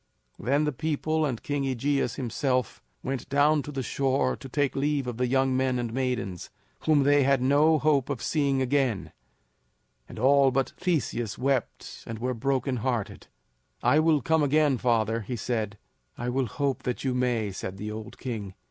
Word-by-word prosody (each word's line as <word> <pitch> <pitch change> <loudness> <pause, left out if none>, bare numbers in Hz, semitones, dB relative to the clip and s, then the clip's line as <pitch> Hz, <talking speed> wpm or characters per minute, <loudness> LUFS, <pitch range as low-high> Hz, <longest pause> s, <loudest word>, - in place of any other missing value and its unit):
Then 140 +7 +1
the 150 - +1
people, 155 +2 -1
and 125 -5 -4
King 145 -1 -1
AEgeus 135 +2 0
himself, 125 -1 -1 0.2
went 130 -1 -4
down 145 +2 +3
to 150 - -7
the 135 -2 -3
shore 135 +3 0
to 135 - -11
take 145 +1 0
leave 145 0 0
of 120 -2 -4
the 125 0 +1
young 130 +1 +2
men 130 -1 +1
and 120 -2 -3
maidens, 125 -9 -2 0.4
whom 150 -3 +4
they 145 +1 +4
had 135 0 +3
no 145 +5 +4
hope 145 -3 +2
of 140 -4 -2
seeing 140 -4 +1
again; 130 -6 0 1.0
and - - -10
all 135 +3 +5
but 135 0 0
Theseus 125 - -1
wept 130 -2 -2
and 115 - -5
were 125 +3 -2
brokenhearted. 125 -2 -2 0.6
"I 150 - +4
will 155 -4 +3
come 160 -1 +2
again, 145 -2 +3
father," 115 -1 +1
he 115 +4 -4
said. 110 -2 -2 0.4
"I 120 +1 -3
will 130 0 0
hope 140 +4 -2
that 125 - -3
you 130 -2 0
may," 120 -5 0
said 95 0 -6
the 105 +2 -5
old 110 0 -8
king. 105 -7 -5
130 Hz, 175 wpm, -27 LUFS, 120-145 Hz, 1.0 s, all